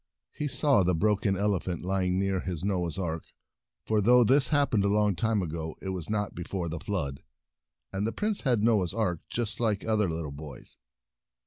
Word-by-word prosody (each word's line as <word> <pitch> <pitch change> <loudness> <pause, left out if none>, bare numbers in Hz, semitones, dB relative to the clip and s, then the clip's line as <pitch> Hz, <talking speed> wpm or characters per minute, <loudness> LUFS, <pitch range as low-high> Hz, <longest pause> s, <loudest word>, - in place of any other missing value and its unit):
He 150 - -3
saw 140 -4 +3
the 90 -1 +2
broken 100 +2 +1
ele 100 -1 +1
phant 85 -2 -5
lying 90 -1 0
near 95 -1 0
his 90 -3 -4
Noah's 90 -4 -1
Ark, 85 -4 -3 0.6
for 110 -1 +2
though 125 +4 +6
this 135 +4 +4
happened 140 -9 +2
a - - +2
long 105 -1 +2
time 110 -1 +1
ago, 80 -1 -5
it 95 - -5
was 90 -2 -4
not 105 -1 -1
be 90 - -7
fore 90 -1 -3
the 80 +1 -4
Flood, 85 -8 -3 0.7
and 100 +2 -1
the - - -1
Prince 210 - -1
had 120 -6 +2
a - - -2
Noah's 105 -6 +2
Ark 95 -7 0
just 115 -2 -3
like 110 -4 0
other 110 -4 +2
little 80 -3 -4
boys. 70 -2 -10
100 Hz, 200 wpm, -28 LUFS, 90-110 Hz, 0.7 s, though